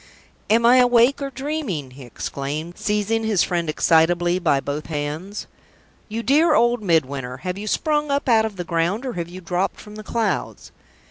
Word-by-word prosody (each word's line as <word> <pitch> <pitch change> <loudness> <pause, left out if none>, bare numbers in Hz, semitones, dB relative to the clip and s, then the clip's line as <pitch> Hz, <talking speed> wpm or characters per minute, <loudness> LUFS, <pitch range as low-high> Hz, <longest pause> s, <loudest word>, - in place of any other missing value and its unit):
"Am 230 +2 +4
I 245 +2 +7
awake 245 +2 +4
or 275 - -2
dreaming?" 265 - -4
he 135 +2 -13
exclaimed, 140 +6 -5
seizing 210 +2 -1
his 215 -5 +2
friend 170 -3 -1
excitably 175 +3 +3
by 155 -6 +2
both 145 +2 -5
hands. 155 +6 -4 0.6
"You 225 +2 -4
dear 300 +7 +4
old 240 +1 +3
Midwinter, 140 -8 0
have 180 -1 -2
you 210 - -6
sprung 300 +5 0
up 280 +1 0
out 225 -3 +5
of 220 -2 -5
the 180 - -4
ground, 175 +8 -1
or 255 - -3
have 170 -1 -4
you 185 +1 -9
dropped 180 +1 -2
from 210 0 -11
the 215 - -8
clouds?" 225 -1 -2
195 Hz, 180 wpm, -22 LUFS, 165-235 Hz, 0.6 s, I